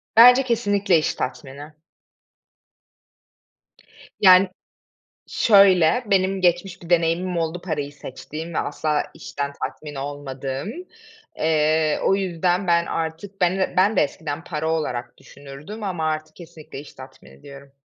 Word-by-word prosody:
Bence 250 Hz, +3 st, +8 dB
kesinlikle 205 Hz, -7 st, +1 dB
iş 155 Hz, -, -1 dB
tatmini. 140 Hz, +3 st, -6 dB, 2.5 s
Yani 185 Hz, -1 st, +7 dB, 0.8 s
şöyle, 195 Hz, +1 st, +4 dB
benim 190 Hz, 0 st, +2 dB
geçmiş 180 Hz, +1 st, 0 dB
bir 170 Hz, -, -12 dB
deneyimim 175 Hz, +1 st, +1 dB
oldu 165 Hz, +1 st, -2 dB
parayı 150 Hz, -5 st, -4 dB
seçtiğim 155 Hz, +4 st, -8 dB
ve -, -, 0 dB
asla 150 Hz, -1 st, -1 dB
işten 140 Hz, 0 st, -5 dB
tatmin 150 Hz, -2 st, -6 dB
olmadığım. 135 Hz, +2 st, -5 dB, 0.7 s
Eee, 155 Hz, 0 st, +1 dB
o 195 Hz, -, +3 dB
yüzden 180 Hz, 0 st, -1 dB
ben 170 Hz, 0 st, +3 dB
artık 165 Hz, +5 st, -5 dB
ben 180 Hz, +1 st, +2 dB
d 190 Hz, -, -1 dB
ben 200 Hz, +4 st, +4 dB
de -, -, +5 dB
eskiden 150 Hz, +1 st, -3 dB
para 160 Hz, -1 st, -3 dB
olarak 125 Hz, -7 st, -3 dB
düşünürdüm 145 Hz, +10 st, -11 dB
ama 180 Hz, -5 st, -2 dB
artık 155 Hz, 0 st, -3 dB
kesinlikle 160 Hz, -5 st, -11 dB
iş 145 Hz, -, -12 dB
tatmini 130 Hz, -, -15 dB
diyorum. 140 Hz, 0 st, -13 dB
160 Hz, 125 wpm, -22 LUFS, 145-185 Hz, 2.5 s, Bence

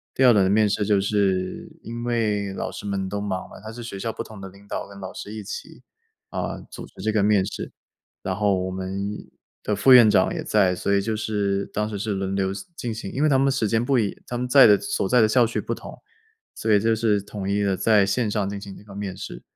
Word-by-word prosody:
第 135 Hz, -, +2 dB
2 125 Hz, -, +8 dB
轮 100 Hz, -3 st, +4 dB
面 105 Hz, 0 st, +4 dB
试， 105 Hz, 0 st, 0 dB
就 100 Hz, -2 st, +3 dB
是 95 Hz, -3 st, 0 dB
因 120 Hz, +1 st, -6 dB
为 105 Hz, -5 st, 0 dB
老 -, -, -4 dB
师 -, -, -8 dB
们 95 Hz, -1 st, -2 dB
都 100 Hz, +1 st, -3 dB
忙 100 Hz, -2 st, -4 dB
吗， -, -, -12 dB
他 110 Hz, -, -7 dB
是 120 Hz, -, -9 dB
学 115 Hz, -4 st, -6 dB
校 115 Hz, +3 st, -3 dB
不 -, -, -5 dB
同 110 Hz, -2 st, -12 dB
的 95 Hz, -, -7 dB
领 100 Hz, +2 st, -18 dB
导 -, -, -4 dB
跟 100 Hz, 0 st, -12 dB
老 95 Hz, -1 st, -7 dB
师 105 Hz, -, -8 dB
一 110 Hz, -, -6 dB
起， -, -, -8 dB, 0.5 s
呃， -, -, -4 dB
组 -, -, -8 dB
织 -, -, -13 dB
这 110 Hz, -, 0 dB
个 105 Hz, -2 st, +2 dB
面 105 Hz, -2 st, +4 dB
试。 -, -, -6 dB, 0.5 s
然 95 Hz, -, -2 dB
后 100 Hz, -1 st, +2 dB
我 95 Hz, -, -3 dB
们 95 Hz, +2 st, -4 dB, 0.5 s
的 105 Hz, -, 0 dB
副 130 Hz, +7 st, +4 dB
院 120 Hz, -3 st, +9 dB
长 105 Hz, -, +3 dB
也 -, -, -4 dB
在， 95 Hz, -4 st, +2 dB
所 100 Hz, -, -1 dB
以 100 Hz, -, +3 dB
就 110 Hz, +2 st, -2 dB
是 100 Hz, -2 st, -1 dB
当 105 Hz, +1 st, -1 dB
时 105 Hz, -, -4 dB
是 105 Hz, +2 st, -3 dB
轮 95 Hz, -1 st, -2 dB
流 95 Hz, -1 st, 0 dB, 0.2 s
进 120 Hz, -7 st, -4 dB
行， 110 Hz, -3 st, -6 dB
因 140 Hz, -, -1 dB
为 155 Hz, -, +5 dB
他 135 Hz, -2 st, +4 dB
们 135 Hz, -, +3 dB
的 -, -, +3 dB
时 120 Hz, -5 st, 0 dB
间 115 Hz, +2 st, +1 dB
不 135 Hz, +1 st, +2 dB
一 105 Hz, -4 st, +2 dB
样， -, -, -14 dB
他 120 Hz, -, -3 dB
们 125 Hz, +1 st, -2 dB
在 135 Hz, -1 st, +8 dB
的 105 Hz, -1 st, +6 dB
所 95 Hz, -, -2 dB
在 125 Hz, -, +5 dB
的 110 Hz, -, +5 dB
校 120 Hz, +1 st, +4 dB
区 115 Hz, -, -2 dB
不 -, -, -3 dB
同， -, -, -10 dB, 0.5 s
所 110 Hz, -, -2 dB
以 105 Hz, -, +6 dB
就 115 Hz, +2 st, +2 dB
是 110 Hz, -2 st, +2 dB
统 100 Hz, -1 st, -6 dB
一 100 Hz, +1 st, +1 dB
地 100 Hz, -1 st, +1 dB
在 105 Hz, 0 st, +4 dB
线 105 Hz, +3 st, 0 dB
上 105 Hz, -2 st, -1 dB
进 100 Hz, 0 st, -5 dB
行 100 Hz, -1 st, -9 dB
一 -, -, -14 dB
个 105 Hz, -1 st, -13 dB
面 100 Hz, -2 st, -5 dB
试， -, -, -8 dB
105 Hz, 285 characters per minute, -24 LUFS, 100-110 Hz, 0.5 s, 院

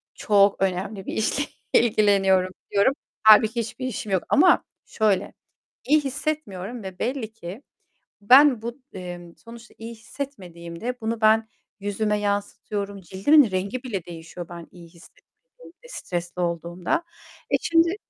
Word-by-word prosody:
çok 200 Hz, -2 st, +3 dB
önemli 190 Hz, +1 st, -2 dB
bir -, -, -5 dB
işle 220 Hz, +6 st, 0 dB, 0.3 s
ilgileniyorum." 195 Hz, -5 st, +3 dB, 0.2 s
diyorum. 200 Hz, +6 st, +3 dB, 0.3 s
Hâlbuki 220 Hz, +2 st, +6 dB
hiçbir 245 Hz, +3 st, -5 dB
işim 215 Hz, -4 st, -5 dB
yok 190 Hz, -2 st, +1 dB
ama 355 Hz, +5 st, +5 dB, 0.2 s
şöyle, 215 Hz, -4 st, 0 dB, 0.5 s
iyi 305 Hz, +2 st, +4 dB
hissetmiyorum 250 Hz, -7 st, -4 dB
ve 190 Hz, -1 st, -8 dB
belli 240 Hz, -3 st, -3 dB
ki 205 Hz, +4 st, -9 dB, 0.6 s
ben 255 Hz, +2 st, +6 dB
bu, 235 Hz, +3 st, -6 dB
emm, 175 Hz, -2 st, -8 dB
sonuçta 235 Hz, 0 st, -13 dB
iyi 225 Hz, +1 st, -8 dB
hissetmediğimde 220 Hz, -3 st, -7 dB
bunu 225 Hz, 0 st, -3 dB
ben 220 Hz, 0 st, +4 dB, 0.3 s
yüzüme 210 Hz, +1 st, -1 dB
yansıtıyorum, 205 Hz, 0 st, -3 dB
cildimin 200 Hz, -, +4 dB
rengi 195 Hz, +7 st, -3 dB
bile 205 Hz, -9 st, -4 dB
değişiyor 170 Hz, 0 st, -9 dB
ben 170 Hz, -1 st, -9 dB
iyi 170 Hz, -2 st, -14 dB
hissetmediğimde, 480 Hz, -, -20 dB
stresli 175 Hz, -, -5 dB
olduğumda. 175 Hz, -, -2 dB, 0.5 s
Eee, -, -, +4 dB
şimdi 335 Hz, +2 st, +3 dB
210 Hz, 125 wpm, -24 LUFS, 185-245 Hz, 0.6 s, Hâlbuki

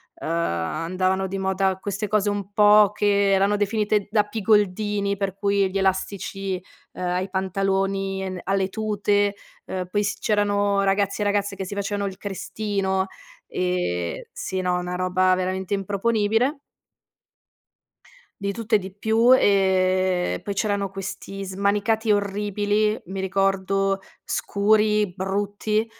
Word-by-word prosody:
uhm, -, -, -7 dB
andavano 170 Hz, -, -1 dB
di 195 Hz, +1 st, -4 dB
moda 190 Hz, 0 st, 0 dB
queste 200 Hz, +1 st, -3 dB
cose 210 Hz, -1 st, +2 dB
un 205 Hz, -1 st, -3 dB
po' 210 Hz, 0 st, +6 dB
che 200 Hz, -1 st, +2 dB
erano 195 Hz, +2 st, +3 dB
definite 210 Hz, 0 st, 0 dB
da 210 Hz, -2 st, +4 dB
pigoldini, 205 Hz, -1 st, +1 dB
per 195 Hz, -1 st, -3 dB
cui 200 Hz, -1 st, +2 dB
gli 195 Hz, -, -2 dB
elastici, 190 Hz, 0 st, -1 dB, 0.3 s
uhm, -, -, -9 dB
ai 180 Hz, +2 st, -1 dB
pantaloni 195 Hz, 0 st, -1 dB
e -, -, -3 dB
n 180 Hz, -, -5 dB
alle 195 Hz, 0 st, +1 dB
tute, 205 Hz, -1 st, 0 dB, 0.3 s
uhm, 185 Hz, -1 st, -4 dB
poi 205 Hz, +2 st, 0 dB
s 205 Hz, 0 st, -2 dB
c'erano 205 Hz, -1 st, +1 dB
ragazzi 200 Hz, +1 st, +1 dB
e -, -, +2 dB
ragazze 205 Hz, -1 st, 0 dB
che 190 Hz, -, -4 dB
si 200 Hz, -, -6 dB
facevano 200 Hz, 0 st, -2 dB
il 190 Hz, -, -11 dB
crestino, 195 Hz, -1 st, -2 dB, 0.4 s
ehm, 180 Hz, -, -2 dB
sì, 190 Hz, -, -4 dB
no, 180 Hz, -1 st, 0 dB
una 180 Hz, 0 st, -3 dB
roba 185 Hz, 0 st, +2 dB
veramente 185 Hz, +1 st, -2 dB
improponibile. 220 Hz, +6 st, +1 dB, 1.8 s
Di 200 Hz, 0 st, -1 dB
tutto 230 Hz, 0 st, 0 dB
e -, -, +7 dB
di 190 Hz, 0 st, -7 dB
più. 225 Hz, +4 st, +4 dB
Ehm, 185 Hz, -2 st, +2 dB
poi 200 Hz, -, -4 dB
c'erano 200 Hz, -1 st, 0 dB
questi 195 Hz, +1 st, -6 dB
smanicati 205 Hz, +3 st, 0 dB
orribili, 205 Hz, +1 st, 0 dB
mi 190 Hz, +1 st, -5 dB
ricordo 195 Hz, 0 st, +1 dB, 0.2 s
scuri, 210 Hz, -1 st, +2 dB
brutti, 205 Hz, +3 st, -1 dB
195 Hz, 135 wpm, -24 LUFS, 190-205 Hz, 1.8 s, e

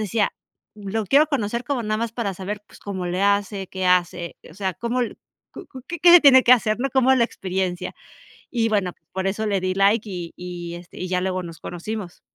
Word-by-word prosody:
decía: 210 Hz, 0 st, 0 dB, 0.4 s
"Lo 210 Hz, +1 st, -4 dB
quiero 290 Hz, +7 st, +5 dB
conocer 235 Hz, -3 st, -1 dB
como 265 Hz, -4 st, -1 dB
nada 215 Hz, 0 st, -1 dB
más 230 Hz, -1 st, -2 dB
para 210 Hz, -5 st, -3 dB
saber, 205 Hz, +3 st, -5 dB
pues, -, -, -17 dB
cómo 190 Hz, -3 st, -4 dB
le 180 Hz, +2 st, -1 dB
hace, 200 Hz, -1 st, +1 dB
qué 190 Hz, -1 st, -3 dB
hace, 175 Hz, -1 st, +1 dB
o 160 Hz, -, -15 dB
sea, 190 Hz, -3 st, -2 dB
¿cómo, 235 Hz, +2 st, -2 dB, 0.5 s
cu? -, -, -9 dB, 0.2 s
¿Que 345 Hz, +1 st, +4 dB
se 350 Hz, -, +10 dB
tiene 260 Hz, -3 st, +8 dB
que 250 Hz, -, +7 dB
hacer? 215 Hz, -3 st, +3 dB, 0.2 s
¿Cómo 265 Hz, 0 st, +4 dB
es -, -, +4 dB
la 235 Hz, -, +5 dB
experiencia?". 185 Hz, -3 st, -3 dB, 0.6 s
Y 230 Hz, -3 st, +1 dB
bueno, 190 Hz, -4 st, +1 dB
pues, -, -, -44 dB
por 190 Hz, 0 st, -2 dB
eso 215 Hz, +3 st, -2 dB
le 200 Hz, -2 st, +1 dB
di 185 Hz, 0 st, -1 dB
like, 205 Hz, +3 st, +3 dB
y 175 Hz, -3 st, -6 dB
y 175 Hz, -1 st, -7 dB
este, 175 Hz, 0 st, -13 dB
y 185 Hz, -, -3 dB
ya 180 Hz, 0 st, 0 dB
luego 185 Hz, -1 st, -1 dB
nos 165 Hz, -2 st, -9 dB
conocimos. 180 Hz, +1 st, -6 dB
200 Hz, 215 wpm, -23 LUFS, 180-230 Hz, 0.6 s, se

